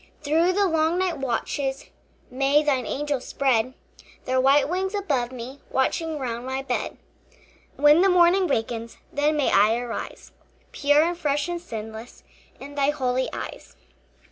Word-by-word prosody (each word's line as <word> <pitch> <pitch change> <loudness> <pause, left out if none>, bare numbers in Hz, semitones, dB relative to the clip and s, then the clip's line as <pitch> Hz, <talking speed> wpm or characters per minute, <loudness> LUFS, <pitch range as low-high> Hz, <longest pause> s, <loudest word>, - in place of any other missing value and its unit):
Through 325 +5 +2
the 400 +1 +2
long 325 -1 +1
night 370 -5 -1
watches 270 +1 -2 0.5
May 275 +3 +2
thine 270 -4 0
angels 285 -2 -3
spread 255 -2 +1 0.5
Their 255 0 +1
white 275 +1 +4
wings 380 +4 -2
above 275 -12 -1
me, 255 +2 -8
Watching 315 +4 0
round 240 -3 -4
my 265 +1 -3
bed. 275 - -3 0.8
When 295 +4 +5
the 390 - +5
morning 360 +1 +4
wakens, 230 -3 -3 0.2
Then 300 +2 +1
may 290 - +2
I 215 +3 +4
arise 240 -1 -6 0.4
Pure 290 +1 +3
and 345 +1 0
fresh 295 -2 -1
and 345 -1 -4
sinless 220 -3 -8 0.4
In 280 +2 -9
thy 285 -1 +1
holy 260 -3 0
eyes. - - -8
280 Hz, 145 wpm, -24 LUFS, 255-320 Hz, 0.8 s, When